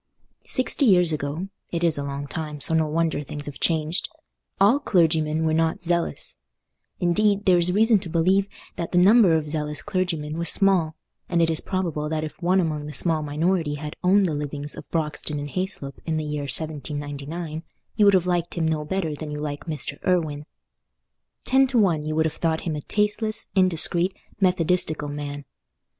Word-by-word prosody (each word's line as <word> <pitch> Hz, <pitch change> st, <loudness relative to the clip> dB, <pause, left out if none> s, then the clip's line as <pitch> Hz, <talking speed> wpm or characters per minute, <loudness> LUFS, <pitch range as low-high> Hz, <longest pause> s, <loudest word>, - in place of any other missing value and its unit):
Sixty 260 Hz, +2 st, +1 dB
years 180 Hz, -5 st, +5 dB
ago—it 165 Hz, +4 st, -5 dB
is 165 Hz, -2 st, +5 dB
a 140 Hz, -, -2 dB
long 140 Hz, 0 st, -4 dB
time, 150 Hz, 0 st, -5 dB
so 145 Hz, -, +3 dB
no 160 Hz, -1 st, +2 dB
wonder 160 Hz, 0 st, 0 dB
things 145 Hz, 0 st, -7 dB
have 145 Hz, -, -6 dB
changed—all 195 Hz, -, 0 dB
clergymen 160 Hz, -, +2 dB
were 160 Hz, -, +1 dB
not 160 Hz, +1 st, 0 dB
zealous; 170 Hz, 0 st, -1 dB, 0.6 s
indeed, 200 Hz, +3 st, +2 dB
there 180 Hz, -3 st, +5 dB
is 175 Hz, +1 st, +3 dB
reason 220 Hz, +2 st, +4 dB
to 185 Hz, -2 st, -7 dB
believe 185 Hz, +4 st, +2 dB, 0.3 s
that 170 Hz, -, -4 dB
the -, -, +3 dB
number 195 Hz, -1 st, +6 dB
of 155 Hz, -1 st, -1 dB
zealous 150 Hz, -1 st, -2 dB
clergymen 170 Hz, -6 st, -2 dB
was 170 Hz, -, +2 dB
small, 180 Hz, -6 st, +3 dB, 0.3 s
and 175 Hz, -, +1 dB
it 165 Hz, -1 st, +3 dB
is 160 Hz, -, +2 dB
probable 165 Hz, -6 st, -2 dB
that 155 Hz, 0 st, -2 dB
if 155 Hz, +3 st, -7 dB
one 180 Hz, +2 st, +3 dB
among 155 Hz, -4 st, -2 dB
the 150 Hz, -, -7 dB
small 160 Hz, -1 st, +1 dB
minority 155 Hz, +1 st, 0 dB
had 150 Hz, +1 st, -7 dB
owned 195 Hz, +2 st, +4 dB
the 165 Hz, -, -1 dB
livings 145 Hz, 0 st, -4 dB
of -, -, -11 dB
Broxton 150 Hz, -2 st, -2 dB
and 145 Hz, 0 st, -5 dB
Hayslope 185 Hz, -7 st, -3 dB
in 160 Hz, -1 st, 0 dB
the 155 Hz, -, -2 dB
year 150 Hz, -1 st, -3 dB
1799, 150 Hz, +2 st, -3 dB, 0.3 s
you 210 Hz, -, +3 dB
would 200 Hz, -1 st, +6 dB
have 180 Hz, -2 st, +2 dB
liked 175 Hz, -1 st, -1 dB
him 165 Hz, -2 st, 0 dB
no 155 Hz, -1 st, -1 dB
better 165 Hz, 0 st, -2 dB
than 150 Hz, +1 st, -7 dB
you 150 Hz, 0 st, -5 dB
like 145 Hz, -1 st, -5 dB
Mr. 155 Hz, -3 st, -4 dB
Irwine. 155 Hz, -5 st, 0 dB, 1.0 s
Ten 265 Hz, +1 st, +4 dB
to 255 Hz, -1 st, 0 dB
one, 180 Hz, -8 st, +3 dB
you 155 Hz, +1 st, -3 dB
would 160 Hz, 0 st, +2 dB
have 160 Hz, -, -1 dB
thought 160 Hz, -1 st, 0 dB
him 160 Hz, -3 st, -3 dB
a 150 Hz, -, -4 dB
tasteless, 215 Hz, +4 st, -1 dB
indiscreet, 185 Hz, 0 st, +2 dB, 0.3 s
methodistical 175 Hz, -4 st, +1 dB
man. 145 Hz, 0 st, -6 dB
160 Hz, 180 wpm, -24 LUFS, 150-185 Hz, 1.0 s, number